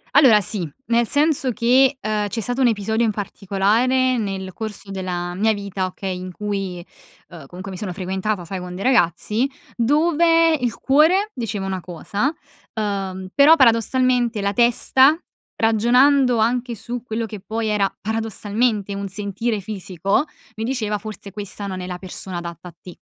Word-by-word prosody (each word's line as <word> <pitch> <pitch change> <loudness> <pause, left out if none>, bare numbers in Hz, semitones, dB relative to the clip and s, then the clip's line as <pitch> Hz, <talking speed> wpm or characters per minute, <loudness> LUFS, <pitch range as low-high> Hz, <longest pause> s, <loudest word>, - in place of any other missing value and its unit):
Allora 245 -8 +7
sì. 180 -4 0 0.2
Nel 235 -1 +3
senso 290 -3 +3
che, 260 +3 +3
uhm, 210 -2 -1
c'è 215 +3 -4
stato 245 +5 -2
un 255 - +5
episodio 220 +1 0
in 225 - +2
particolare 215 +6 +1
nel 190 -3 -4
corso 215 -3 -7
della 180 -2 -3
mia 215 +4 +2
vita, 200 -2 -3
okay, 185 0 -4
in 185 0 -7
cui, 195 -3 -4 0.4
uhm, 160 -6 -11
comunque 185 +4 -8
mi 185 - -7
sono 190 -4 -4
frequentata 190 +1 -3
sai 190 +3 -5
con 180 0 -7
dei 190 - -5
ragazzi, 225 +2 +2 0.3
dove 330 +5 +3
il 250 -6 -1
cuore 345 +10 +3
diceva 220 -6 -4
una 190 -1 -3
cosa, 200 - -2 0.4
uhm, 195 -3 -3
però 290 +3 +7
paradossalmente 245 -2 +2
la 200 0 0
testa 260 +6 +4 0.4
ragionando 245 +4 +4
anche 240 +2 0
su 235 +3 -6
quello 230 -1 -3
che 210 -2 -8
poi 220 +3 -3
era 205 -2 +1
paradossalmente 220 -1 -1
un 200 0 -4
sentire 205 +3 -3
fisico 195 - -1 0.3
mi 220 - -4
diceva 225 -4 -1
forse 205 -1 -8
questa 205 0 -5
non 185 -1 -5
è 180 - -5
la 180 -1 -5
persona 185 0 -7
adatta 170 0 -7
a 170 - -12
te. 180 - -12
215 Hz, 160 wpm, -21 LUFS, 190-245 Hz, 0.4 s, Allora